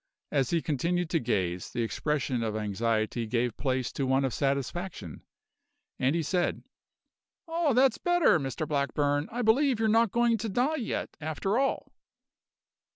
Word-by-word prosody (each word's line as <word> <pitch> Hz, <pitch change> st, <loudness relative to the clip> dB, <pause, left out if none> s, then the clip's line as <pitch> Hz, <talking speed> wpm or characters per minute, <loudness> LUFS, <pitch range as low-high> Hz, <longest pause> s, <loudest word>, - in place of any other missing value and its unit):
As 135 Hz, -3 st, +1 dB
he 170 Hz, -2 st, 0 dB
continued 170 Hz, +4 st, -1 dB
to 165 Hz, -, +2 dB
gaze, 90 Hz, -, -1 dB
the 120 Hz, -, -2 dB
expression 130 Hz, +1 st, -1 dB
of 110 Hz, -2 st, -2 dB
anxiety 110 Hz, +2 st, -1 dB
gave 120 Hz, 0 st, 0 dB
place 130 Hz, -3 st, -1 dB
to 135 Hz, -, -2 dB
one 135 Hz, +1 st, +2 dB
of 130 Hz, -, -2 dB
satisfaction, 140 Hz, -, -3 dB, 0.8 s
and 135 Hz, +5 st, +2 dB
he 170 Hz, -, 0 dB
said: 175 Hz, +3 st, -1 dB, 0.8 s
"Ah, 325 Hz, -3 st, +1 dB
that's 255 Hz, -1 st, +3 dB
better, 350 Hz, -, +3 dB
Mr 135 Hz, +2 st, -3 dB
Blackburn! 145 Hz, 0 st, 0 dB
I 245 Hz, +2 st, -2 dB
believe 250 Hz, +2 st, +3 dB
you're 225 Hz, -, +2 dB
not 225 Hz, -1 st, +3 dB
going 235 Hz, 0 st, +2 dB
to 220 Hz, +2 st, -3 dB
die 255 Hz, +10 st, +1 dB
yet, 240 Hz, -, -3 dB
after 160 Hz, -, -1 dB
all." 275 Hz, 0 st, -1 dB
150 Hz, 155 wpm, -28 LUFS, -, 0.8 s, that's